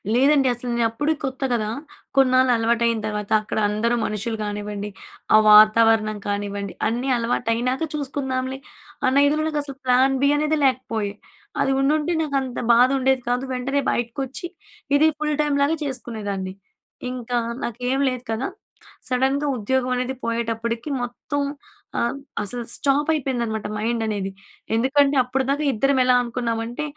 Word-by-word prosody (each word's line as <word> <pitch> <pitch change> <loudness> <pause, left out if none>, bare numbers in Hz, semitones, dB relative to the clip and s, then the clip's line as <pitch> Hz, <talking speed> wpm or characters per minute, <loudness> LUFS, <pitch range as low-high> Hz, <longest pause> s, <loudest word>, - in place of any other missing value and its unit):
లేదండి 275 +1 +4
అసలు. 245 +1 -6
నేను 235 -1 +2
అప్పుడే 295 +7 0
కొత్త 265 -1 -4
కదా! 215 -3 0 0.5
కొన్నాళ్ళు 255 -1 +4
అలవాటు 230 +1 +1
అయిన 230 -1 +1
తర్వాత, 210 -1 -4
అక్కడ 215 - -5
అందరూ 225 +3 +1
మనుషులు 220 +2 -3
కానివ్వండి, 205 0 -4 0.5
ఆ - - +9
వాతావరణం 215 0 +6
కానివ్వండి, 200 -1 -3
అన్నీ 245 +4 -1
అలవాటు 235 0 -1
అయినాక 250 +5 -1
చూసుకుందాంలే. 265 -2 -3 0.5
అన్న 280 +2 +4
ఇదిలో 305 +2 +1
నాకు 305 -1 -1
అసలు 275 -2 -9
ప్లాన్ 260 +2 +4
బి 280 - +5
అనేది 305 +1 +1
లేకపోయే. 225 -6 0 0.5
అది 270 - +2
ఉండుంటే 300 +4 +1
నాకు 295 -3 -2
అంత 255 -2 -5
బాధ 245 +2 +6
ఉండేది 265 0 +2
కాదు. 245 +2 0
వెంటనే 275 +3 -1
బయటకొచ్చి, 265 +7 -3 0.5
ఇది 310 +2 +5
ఫుల్ 300 0 0
టైమ్ 295 -1 +1
లాగా 315 +3 +1
చేసుకునేదాన్ని. 215 -8 -4 0.6
ఇంకా 245 -1 -3 0.3
నాకేమి 250 +4 -1
లేదు 250 -1 -6
కదా! 225 +4 -1 0.6
సడన్‌గా 265 +3 +1
ఉద్యోగం 255 +4 0
అనేది 250 +1 -2
పోయేటప్పటికి 230 +2 -2
మొత్తం 245 +4 -4 0.6
ఆహ్, 235 +3 -1 0.2
అసలు 235 +4 -2
స్టాప్ 285 +1 +1
అయిపోయిందనమాట 240 -8 -1
మైండ్ 225 +2 -1
అనేది. 200 -3 -2 0.4
ఎందుకంటే 275 +4 +3
అప్పటిదాకా 270 +3 -1
ఇద్దరం 275 +4 +1
ఎలా 250 0 +4
అనుకున్నామంటే, 235 +1 -3
250 Hz, 140 wpm, -22 LUFS, 225-270 Hz, 0.6 s, ఆ